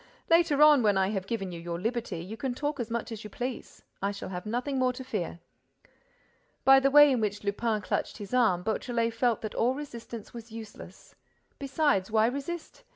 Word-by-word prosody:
Later 330 -3 +5
on, 300 -3 +7
when 205 -3 +3
I 190 0 +2
have 195 -2 -3
given 195 -5 -3
you 170 - -7
your 170 0 -5
liberty, 225 -5 -3
you 200 +5 -7
can 245 +2 -3
talk 290 +1 -3
as 235 -2 -3
much 235 0 -3
as 220 -2 -6
you 210 - -8
please—I 235 -4 -5
shall 200 - -7
have 180 +2 -6
nothing 250 +5 -1
more 255 -1 +3
to 260 - -7
fear." 175 -8 -4 1.2
By 270 0 +8
the 270 0 +3
way 295 0 +8
in 250 -3 +1
which 205 -1 -2
Lupin 210 +2 -1
clutched - - -2
his 205 +2 -9
arm, 220 -8 +3
Beautrelet 230 +2 -1
felt 235 0 +1
that 215 - -5
all 250 +3 +1
resistance 235 -6 -8
was 235 -1 -10
useless. 225 -1 -11 0.5
Besides, 275 -8 +1
why 220 0 +3
resist? 280 +7 -4
230 Hz, 195 wpm, -28 LUFS, 205-265 Hz, 1.2 s, By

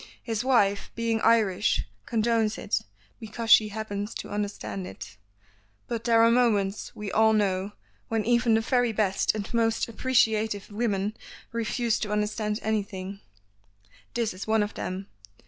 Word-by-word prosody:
His 225 -1 -2
wife, 205 -6 +2
being 230 -1 0
Irish, 210 -3 +3 0.2
condones 225 -1 +1
it, - - -1 0.4
because 225 0 -4
she 215 -2 +8
happens 210 0 -5
to - - -6
understand 110 - -4
it, 95 +1 -10 0.7
but 230 -1 -4
there 230 -1 +5
are 230 - +6
moments, 215 -5 +1
we 210 -2 -5
all 220 0 +4
know, 200 -1 0 0.3
when 225 -2 -1
even 235 -1 +3
the 225 - +3
very 245 0 +2
best 200 -1 +1
and 210 +2 -5
most 225 -1 +1
appreciative 220 -4 +1
women 205 -1 -1 0.4
refuse 230 0 0
to 210 - -3
understand 210 0 -1
anything. 200 -2 -3 1.0
This 230 -4 0
is 185 +3 -7
one 220 -1 +3
of 205 - -4
them. 185 +2 -4
215 Hz, 145 wpm, -27 LUFS, 205-230 Hz, 1.0 s, she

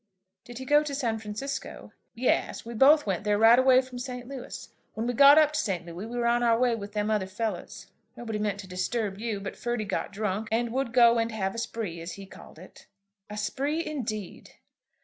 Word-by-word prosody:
"Did 240 -1 -10
he 260 - -7
go 295 +2 +5
to 295 -2 -4
San 230 -5 -1
Francisco?" 215 +6 -6 0.2
"Yes, 245 -1 0
we 235 - -7
both 285 +6 +5
went 190 -4 -2
there 210 -1 +1
right 225 +3 +7
away 260 0 +5
from 255 -1 -9
St. 250 -1 -6
Louis. 270 -2 -8 0.3
When 220 - -2
we 245 - -1
got 280 +4 +8
up 305 -1 +5
to 300 - 0
St. 185 -5 -2
Louis 170 - -9
we 240 +1 -6
were 240 - 0
on 240 0 +2
our 230 -1 +3
way 245 0 +2
with 205 -2 -6
them 210 0 -1
other 205 -3 0
fellows. 215 +3 -5 0.3
Nobody 225 -3 -4
meant 205 -1 -2
to 195 - -12
disturb 195 +2 -2
you; 220 -2 -3
but 195 - -6
Ferdy 240 -3 -3
got 200 - -3
drunk, 210 +1 -2
and 230 +1 0
would 265 -2 -1
go 235 -1 +5
and 230 0 -1
have 195 -3 -2
a 230 - -5
spree, 220 -8 -4
as 170 +1 -6
he 195 - -9
called 190 - -14
it." 185 +3 -15 0.4
"A 210 - -7
spree, 285 +9 -2
indeed!" 220 - -5
230 Hz, 220 wpm, -27 LUFS, 210-250 Hz, 0.4 s, got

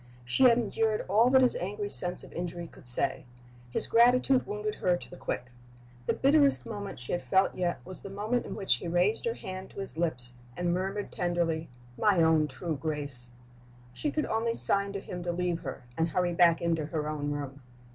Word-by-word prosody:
She 125 - +3
had 235 -2 +6
endured 220 -1 0
all 220 +6 +4
that 260 0 +5
his 250 - +3
angry 205 +2 -4
sense 180 0 0
of - - -13
injury 175 0 -5
could 150 - -5
say. 130 +2 +6 0.5
His - - -1
gratitude 250 +3 +4
wounded 210 +1 -3
her 180 -1 +2
to - - -11
the - - -9
quick. 125 -7 -5 0.6
The - - +2
bitterest 280 0 +3
moment 205 - -6
she 125 - -6
had 175 - -1
felt 190 0 +2
yet 175 -2 -2
was 185 0 -9
the - - -9
moment 215 +5 -2
in - - -6
which 195 - +1
he 170 - -7
raised 180 +6 +1
her 230 0 -1
hand 185 0 -7
to - - -11
his 195 -5 -7
lips, 125 -8 +1 0.2
and 175 -1 0
murmured 195 +3 -3
tenderly, 170 -3 -1 0.3
"My 205 -4 +3
own 160 -1 +3
true 160 +4 -4
Grace!" 145 -6 0 0.6
She 295 - -2
could 305 +1 -1
only 230 +1 -1
sign 200 0 +3
to 200 - -3
him 180 -2 -7
to 175 0 -2
leave 175 -1 -1
her, 135 -5 -7
and 165 +4 +1
hurry 175 +1 0
back 170 -1 +4
into 165 -3 0
her 155 -1 -3
own 150 -1 -3
room. 140 -1 -5
180 Hz, 205 wpm, -29 LUFS, 160-210 Hz, 0.6 s, had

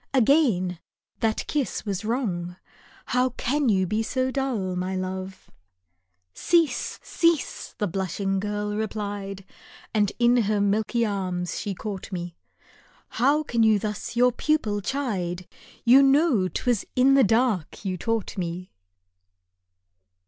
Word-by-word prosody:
again 225 - +3 0.4
that 220 -1 0
kiss 290 -6 -2
was 200 -1 -3
wrong, 195 -7 -2 0.6
How 250 +1 +3
can 275 +1 +1
you 190 -3 +3
be 215 +5 0
so 255 +4 -1
dull, 245 -9 -2
my 185 +1 -2
love? 185 0 -5 0.8
"Cease, 335 -3 +1
cease 335 -4 0
!" - - -53
the 210 - 0
blushing 195 +1 -2
girl 210 +1 -2
replied 205 -2 -4 0.5
And 210 -2 +2
in 240 0 +4
her 215 -2 +1
milky 215 +3 +1
arms 185 -4 -2
she 200 -2 -4
caught 200 0 -6
me 175 -2 -5 0.4
" - - -30
How 285 +5 +3
can 235 -5 0
you 220 -1 +5
thus 210 +2 -4
your 250 +1 +4
pupil 240 -6 0
chide; 190 -8 -2 0.4
You 255 +3 +8
know 275 - +4
'I - - -4
was 245 -5 +2
in 260 +2 +5
the 275 -1 +6
dark 220 -4 +1
you 185 -1 -1
taught 220 +1 -2
me 175 +1 -4
210 Hz, 135 wpm, -25 LUFS, 190-250 Hz, 0.8 s, You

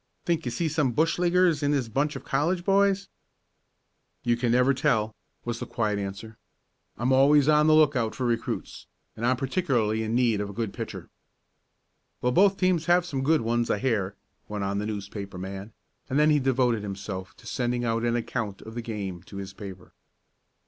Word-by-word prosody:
"Think 165 -3 0
you 120 - -2
see 160 +8 -1
some 150 -5 +1
bushleaguers 175 0 +3
in 145 - +1
this 140 -5 +1
bunch 140 +6 0
of 135 - -7
college 170 +6 0
boys?" 200 0 +3 1.2
"You 120 -1 +2
never 125 +3 +4
can 130 - -7
tell," 110 -7 +1 0.3
was 120 -1 -3
the - - -5
quiet 105 -3 -1
answer. 100 +3 -6 0.6
"I'm 120 +4 0
always 140 +2 +5
on 150 0 +5
the 155 - +6
lookout 140 -8 +3
for 130 - -2
recruits, 120 -1 -3 0.3
and 110 - -7
I'm 125 +1 +2
particularly 125 - 0
in 110 +1 -1
need 120 -4 +2
of 100 - -4
a - - -8
good 110 -1 -3
pitcher." 115 -1 -7 1.1
"Well, 125 - +1
both 195 +6 +4
teams 180 -3 +1
have 175 0 +4
some 140 -7 -3
good 155 +3 +3
ones 120 +1 0
I - - +2
hear," 100 -4 -1 0.3
went 105 -1 -3
on 100 +1 -1
the 105 - -3
newspaper 100 -2 -6
man, 95 +3 -6 0.4
and 135 - 0
then 150 +1 +5
he 150 - +4
devoted 125 -4 +1
himself 95 -2 -6
to - - -18
sending 120 -1 -1
out 115 0 0
an 120 0 +1
account 115 -4 -3
of 110 - -9
the 120 - -4
game 100 -6 -5
to 100 - -10
his 95 -1 -6
paper. 95 -2 -10
120 Hz, 190 wpm, -26 LUFS, 105-150 Hz, 1.2 s, the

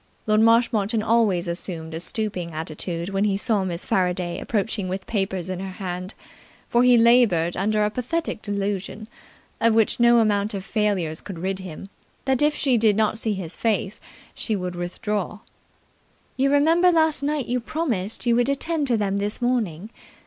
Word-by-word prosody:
Lord 215 0 +3
Marshmoreton 225 -1 +3
always 215 -7 +2
assumed 170 -2 -4
a 160 - -4
stooping 180 -2 -4
attitude 165 +2 -4
when 195 0 0
he 200 -2 +1
saw 210 -1 +1
Miss 175 -1 -4
Faraday 180 -1 0
approaching 205 -3 -2
with 190 +1 -4
papers 190 -4 -2
in 185 -1 -4
her 190 0 -6
hand; 185 +1 -6 0.5
for 240 - +2
he 250 -1 +6
laboured 230 -8 +4
under 210 +2 +1
a 210 - -1
pathetic 255 +2 -3
delusion, 205 +1 -3 0.5
of 230 -1 +3
which 225 +1 +2
no 235 0 +6
amount 210 -1 +1
of 195 -1 -5
failures 195 -8 -1
could 195 -4 -8
rid 190 +3 -3
him, 185 +1 -9 0.4
that 265 -1 +3
if 295 0 +3
she 255 -4 +2
did 215 -2 +4
not 220 +1 +1
see 220 -2 0
his 180 -4 -5
face 210 -2 -1 0.3
she 220 - -2
would 180 -2 -4
withdraw. 195 +4 -3 1.0
"You 275 +1 +2
remember 325 +5 +4
last 315 -4 +2
night 290 -2 -1
you 250 +1 -1
promised 235 - -2
you 235 -1 +3
would 245 +2 +2
attend 295 +2 -1
to 240 -3 +2
them 200 -2 -1
this 205 +1 -2
morning." 220 -6 -1
210 Hz, 170 wpm, -23 LUFS, 185-235 Hz, 1.0 s, he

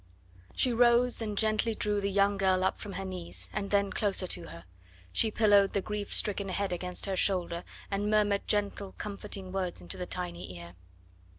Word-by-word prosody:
She 250 - +3
rose 240 +1 +4
and 210 -2 -3
gently 220 +1 +1
drew 210 -1 0
the 200 - 0
young 200 +1 +3
girl 190 -1 +2
up 190 - 0
from 205 -2 -7
her 195 - -4
knees, 180 -2 -3
and 200 -2 -3
then 200 -1 +2
closer 195 -3 +2
to - - -2
her; 85 +1 -11 0.5
she 225 - +3
pillowed 205 -2 +4
the 200 - +1
grief 210 -1 -4
stricken 200 -1 +2
head 195 0 -1
against 180 0 -4
her 195 -1 -1
shoulder, 180 -3 +1 0.3
and 200 +1 0
murmured 205 -1 +2
gentle, 205 -2 -1
comforting 200 -2 -5
words 185 -2 -3
into 90 -1 -5
the 180 - -5
tiny 90 0 -5
ear. 85 0 -10
200 Hz, 185 wpm, -30 LUFS, 185-210 Hz, 0.5 s, rose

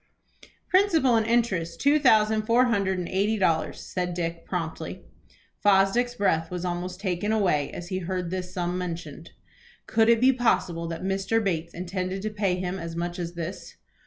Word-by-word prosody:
"Principal 335 - +4
and 220 -1 +2
interest 190 -8 0
two 290 +2 +4
thousand 220 -5 +4
four 240 +2 +5
hundred 200 -5 +1
and 180 -1 -3
eighty 205 +3 +1
dollars," 165 -5 0
said 180 -1 -3
Dick, 165 -1 -3
promptly. 165 -3 -4 0.6
Fosdick's 205 +5 +3
breath 165 -7 +1
was 180 0 -4
almost 180 +1 -4
taken 195 +1 -1
away 180 -10 +1
as 175 0 -8
he 185 - -2
heard 180 -1 -3
this 180 -1 -4
sum 180 0 -2
mentioned. 165 -3 -6 0.6
Could 225 0 +3
it 230 -1 +5
be 260 +2 +5
possible 175 -9 0
that 165 +1 -5
Mr. 195 +3 0
Bates 170 -4 -2
intended 185 +2 -3
to 215 - -2
pay 200 -3 0
him 185 +1 -3
as 165 -1 -6
much 175 +1 -3
as 170 0 -5
this? 170 +2 -6
185 Hz, 170 wpm, -26 LUFS, 175-215 Hz, 0.6 s, four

